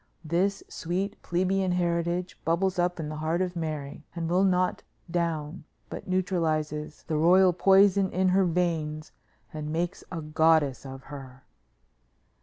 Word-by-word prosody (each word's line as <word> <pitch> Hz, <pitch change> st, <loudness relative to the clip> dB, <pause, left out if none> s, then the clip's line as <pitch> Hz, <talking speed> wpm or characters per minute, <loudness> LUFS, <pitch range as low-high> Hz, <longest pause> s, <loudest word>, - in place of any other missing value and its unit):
This 185 Hz, +5 st, 0 dB
sweet 190 Hz, +4 st, -3 dB
plebeian 185 Hz, +1 st, 0 dB
heritage 175 Hz, 0 st, -1 dB
bubbles 180 Hz, +3 st, 0 dB
up 175 Hz, 0 st, 0 dB
in 155 Hz, -, -3 dB
the 155 Hz, 0 st, -5 dB
heart 160 Hz, +2 st, -1 dB
of 185 Hz, -1 st, -1 dB
Mary, 155 Hz, -4 st, -4 dB
and 165 Hz, -1 st, -2 dB
will 180 Hz, +3 st, +2 dB
not 185 Hz, -1 st, +1 dB, 0.3 s
down, 165 Hz, -2 st, -2 dB, 0.3 s
but -, -, -7 dB
neutralizes 160 Hz, -5 st, -1 dB
the 155 Hz, -, -1 dB
royal 180 Hz, +3 st, +5 dB
poison 195 Hz, +1 st, +4 dB
in 185 Hz, +1 st, +1 dB
her 190 Hz, +1 st, +3 dB
veins 160 Hz, -3 st, -1 dB, 0.4 s
and 150 Hz, -1 st, -5 dB
makes 175 Hz, +4 st, -2 dB
a 170 Hz, -, -4 dB
goddess 155 Hz, -4 st, +2 dB
of 135 Hz, 0 st, -9 dB
her." 130 Hz, -2 st, -10 dB
170 Hz, 140 wpm, -27 LUFS, 155-185 Hz, 0.4 s, royal